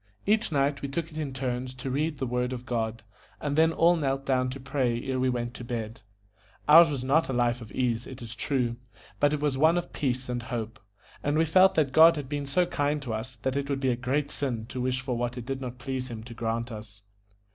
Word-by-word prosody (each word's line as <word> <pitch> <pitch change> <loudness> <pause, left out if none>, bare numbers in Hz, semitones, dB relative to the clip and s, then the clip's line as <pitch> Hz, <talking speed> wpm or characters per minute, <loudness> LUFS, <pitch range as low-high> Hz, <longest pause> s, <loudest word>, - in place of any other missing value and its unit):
Each 215 -1 +2
night 140 -1 +1
we 140 - -3
took 160 +3 -3
it 155 - -9
in 145 -3 -3
turns 130 -1 -3
to 130 +1 -5
read 150 +3 -1
the 135 - -2
Word 125 +1 -1
of 125 0 -6
God, 115 -2 -2 0.4
and 145 -1 -2
then 160 +1 +5
all 170 +2 +4
knelt 135 -3 -1
down 130 -1 +1
to 135 +2 -6
pray 130 -3 0
ere 130 -1 -1
we 130 0 +2
went 120 -1 -2
to 125 - -8
bed. 115 -3 -5 0.7
Ours 165 +2 +9
was 140 -4 -3
not 145 +5 +2
a - - -1
life 120 0 +1
of 110 - -10
ease, 120 -2 -1
it 130 -1 -9
is 115 -1 -7
true, 125 -4 -1 0.4
but 145 - +4
it 150 - 0
was 145 -3 0
one 160 +3 +5
of 175 - -4
peace 130 -2 -1
and 120 -1 -2
hope; 115 -2 -5 0.4
and 145 +1 0
we 165 - +4
felt 185 +4 +5
that 150 -4 +2
God 165 +4 +8
had 145 -3 -5
been 145 0 -3
so 175 +6 +2
kind 150 -3 0
to 120 -4 -3
us 115 +4 -5
that 130 0 0
it 140 0 -2
would 140 -1 0
be 130 -2 +1
a - - +1
great 135 +4 -1
sin 120 -6 -2
to 130 - -4
wish 130 0 0
for 125 -1 -2
what 120 +1 -2
it 120 - -6
did 135 +1 -4
not 125 -1 -6
please 130 0 -4
Him 110 -2 -7
to 120 +1 -9
grant 115 +1 -2
us. 105 -2 -10
130 Hz, 250 wpm, -28 LUFS, 120-145 Hz, 0.7 s, Ours